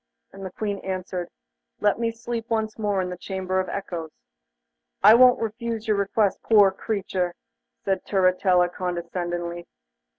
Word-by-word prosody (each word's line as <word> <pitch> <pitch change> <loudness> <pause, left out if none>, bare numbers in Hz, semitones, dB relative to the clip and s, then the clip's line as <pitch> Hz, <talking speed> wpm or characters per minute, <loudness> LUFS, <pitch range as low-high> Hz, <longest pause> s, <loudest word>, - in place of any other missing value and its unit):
And 195 0 -10
the 190 - -4
Queen 205 0 -3
answered: 185 -2 -4 0.5
'Let 210 +1 +2
me 230 -1 +1
sleep 230 0 -5
once 220 -1 -1
more 205 -3 0
in 180 - -4
the 180 - -6
Chamber 190 0 -2
of 185 - -2
Echoes.' 175 -5 -5 0.9
'I 215 - +9
won't 250 +1 +7
refuse 225 0 -4
your 215 -2 +2
request, 200 0 +1
poor 205 -3 +5
creature,' 190 -3 -2 0.5
said 195 -1 0
Turritella 185 -2 +3
condescendingly. 175 -1 -4
195 Hz, 140 wpm, -24 LUFS, 180-220 Hz, 0.9 s, I